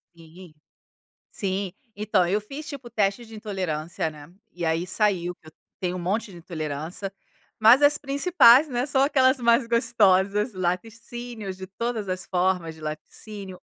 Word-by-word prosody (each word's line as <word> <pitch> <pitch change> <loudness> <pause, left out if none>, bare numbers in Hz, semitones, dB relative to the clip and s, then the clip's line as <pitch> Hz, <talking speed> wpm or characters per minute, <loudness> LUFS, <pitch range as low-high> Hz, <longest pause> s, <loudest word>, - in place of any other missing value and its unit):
Sim, 165 +1 -15 0.8
sim. 195 -2 -2 0.2
Então, 205 -3 +1
eu 200 +4 +1
fiz, 275 +9 -9
tipo, 275 -5 -8
teste 210 +2 -1
de 225 - -12
intolerância, 175 -7 -3
né, 155 +1 -12 0.2
e 175 -1 -5
aí 165 +2 0
saiu 185 -3 0
que 160 - -26
eu - - -15 0.3
tenho 180 -1 -2
um - - -4
monte 200 +5 -2
de 175 - -11
intolerância, 160 +3 -5 0.5
mas, 230 +6 +7
as 290 +1 +5
principais, 280 -1 +5
né, 250 -1 -1
são 275 -2 +2
aquelas 265 -1 +3
mais 235 +1 +3
gostosas. 210 -2 +2
Laticínios, 220 +3 -4
de 190 0 -8
todas 220 +1 -4
as 185 0 -3
formas 180 -3 0
de - - -15
laticínios, 185 +5 -8
200 Hz, 155 wpm, -25 LUFS, 180-235 Hz, 0.8 s, mas